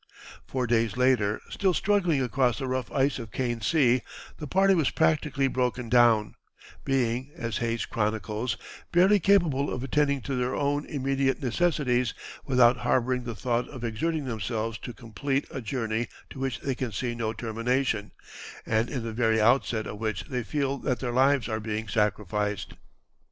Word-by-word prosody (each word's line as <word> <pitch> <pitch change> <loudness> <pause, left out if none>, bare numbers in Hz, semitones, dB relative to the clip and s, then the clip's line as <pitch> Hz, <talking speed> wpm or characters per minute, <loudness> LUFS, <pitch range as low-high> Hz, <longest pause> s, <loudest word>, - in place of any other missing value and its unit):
Four 130 -2 -1
days 115 -1 +1
later, 125 -5 +2
still 190 -3 +1
struggling 180 -9 +2
across 125 0 +1
the 135 - -3
rough 130 -1 -2
ice 140 -1 +1
of 115 -1 -8
Kane 120 -3 -2
Sea, 125 -1 +3 0.4
the 150 - -5
party 195 +4 +4
was 160 -7 +2
practically 150 -4 +1
broken 125 -2 -1
down, 115 -3 +4 0.5
being, 130 0 0
as 115 -7 -3
Hayes 115 -1 -1
chronicles, 110 +2 -2 0.3
"barely 190 +4 +5
capable 165 -8 +3
of 125 - -3
attending 140 0 +1
to 140 - -4
their 125 0 -1
own 145 +1 0
immediate 135 -1 0
necessities 130 -3 +1 0.3
without 125 -2 +4
harboring 125 +1 0
the 120 -2 -4
thought 120 +4 -1
of 130 -4 -9
exerting 145 +7 -1
themselves 115 -1 -3
to - - -7
complete 120 +5 -3
a 130 - -5
journey 115 -1 -2 0.2
to 135 - -9
which 135 -2 -2
they 135 - -1
can 125 -2 -3
see 120 +5 -2
no 115 -2 -2
termination, 115 0 -1 0.6
and 110 +1 +1
in 125 -5 -3
the 115 -1 -4
very 115 -1 +2
outset 115 -1 +2
of 105 - -7
which 110 -3 -2
they 125 -2 -3
feel 140 +2 -1
that 130 -2 -1
their 125 -2 -2
lives 135 -2 +3
are 110 -2 -2
being 110 0 -3
sacrificed." 105 -1 -1
125 Hz, 165 wpm, -27 LUFS, 115-135 Hz, 0.6 s, barely